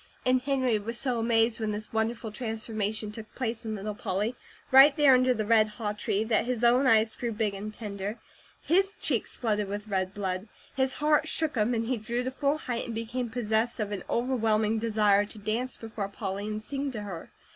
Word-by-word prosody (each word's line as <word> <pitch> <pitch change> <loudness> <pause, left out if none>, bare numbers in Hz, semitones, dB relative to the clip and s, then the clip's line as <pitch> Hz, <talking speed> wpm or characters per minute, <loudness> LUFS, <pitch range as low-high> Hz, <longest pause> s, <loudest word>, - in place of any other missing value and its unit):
And 255 0 +3
Henry 260 -5 +1
was 230 +3 -4
so 250 -2 0
amazed 225 0 +2
when 220 -1 -1
this 210 +1 -5
wonderful 220 0 -1
transformation 220 -2 -3
took 215 0 -10
place 235 -2 -3
in 220 -1 -3
little 210 +1 -4
Polly, 210 +3 -2 0.4
right 275 +3 +8
there 290 -3 +7
under 255 0 +4
the 220 -4 0
red 220 0 +5
haw 215 -3 -2
tree, 210 0 -1
that 220 0 +1
his 245 -1 -2
own 250 +3 +5
eyes 220 -1 +4
grew 240 -1 -3
big 215 -2 -1
and 205 +2 -5
tender, 205 0 -5 0.5
his 390 +5 +2
cheeks - - 0
flooded 210 -4 0
with 205 +2 -5
red 190 0 -1
blood, 190 0 -3 0.3
his 265 -1 +1
heart 300 +1 +2
shook 315 -2 0
him, 235 +1 +1
and 225 0 -1
he 250 +1 0
drew 235 +3 -2
to 260 - -2
full 285 +2 0
height, 245 -6 -3
and 230 - -5
became 235 +2 -3
possessed 225 0 0
of 210 -1 -2
an 200 -3 -4
overwhelming 225 -3 +1
desire 210 -2 +3
to 205 - -10
dance 225 +5 -2
before 220 -3 -5
Polly, 200 0 -4
and 215 0 -4
sing 280 +3 -3
to 220 -5 -5
her. 185 -5 -7
225 Hz, 205 wpm, -28 LUFS, 210-250 Hz, 0.5 s, right